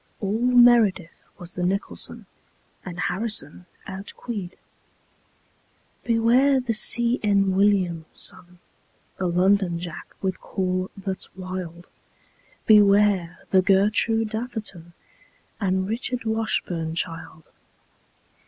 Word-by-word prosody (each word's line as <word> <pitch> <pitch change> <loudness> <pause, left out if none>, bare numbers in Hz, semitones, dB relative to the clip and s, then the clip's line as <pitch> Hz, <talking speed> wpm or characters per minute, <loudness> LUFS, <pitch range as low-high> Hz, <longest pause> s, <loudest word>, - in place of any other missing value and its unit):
All 205 +2 -1
meredith 240 -8 +4
was 175 -2 -7
the 180 - -5
nicholson, 195 +4 -3 0.6
And 175 -2 -8
harrison 190 -3 -2 0.2
outqueed. 195 0 -6 1.5
Beware 245 +4 +3
the 245 -2 -2
see 235 +2 +1
enn 200 -2 +3
william, 185 -4 +2
son, 180 0 -7 0.6
The 185 - -1
londonjack 180 -2 0
with 190 -1 -2
call 185 -1 -2
that's 190 -1 -5
wild. 185 -2 -7 0.8
Beware 205 -4 +4
the 190 - +5
gertroo 210 +4 +3
datherton 215 -6 -6 0.7
And 190 -2 0
richardwashburnchild. 200 -9 -2
195 Hz, 85 wpm, -24 LUFS, 180-220 Hz, 1.5 s, the